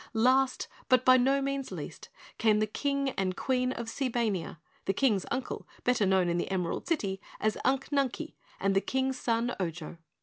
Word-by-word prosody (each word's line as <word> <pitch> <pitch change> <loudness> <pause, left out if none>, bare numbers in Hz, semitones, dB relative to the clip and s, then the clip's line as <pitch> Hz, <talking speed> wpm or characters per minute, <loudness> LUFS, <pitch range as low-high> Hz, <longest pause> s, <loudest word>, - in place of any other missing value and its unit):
Last, 260 +3 +3 0.2
but 255 0 +4
by 255 0 +8
no 270 +2 +3
means 275 -1 -2
least, - - -7 0.3
came 215 -2 +4
the 215 - +2
King 280 +5 -1
and 185 -3 -2
Queen 255 -1 +1
of 235 -2 -4
Seebania, 230 -9 -1 0.3
the 195 - +1
King's 215 -8 +2
uncle, 260 0 -3 0.2
better 245 -5 +2
known 190 -2 +3
in 170 0 +1
the - - -2
Emerald 180 -3 -2
City 200 - -1 0.2
as 215 -1 +1
Unc 270 0 +1
Nunkie, 285 +2 -1 0.3
and 195 0 +1
the 195 - +4
King's 265 +1 -1
son 235 +1 0
Ojo. 170 -2 -4
245 Hz, 175 wpm, -30 LUFS, 195-265 Hz, 0.3 s, by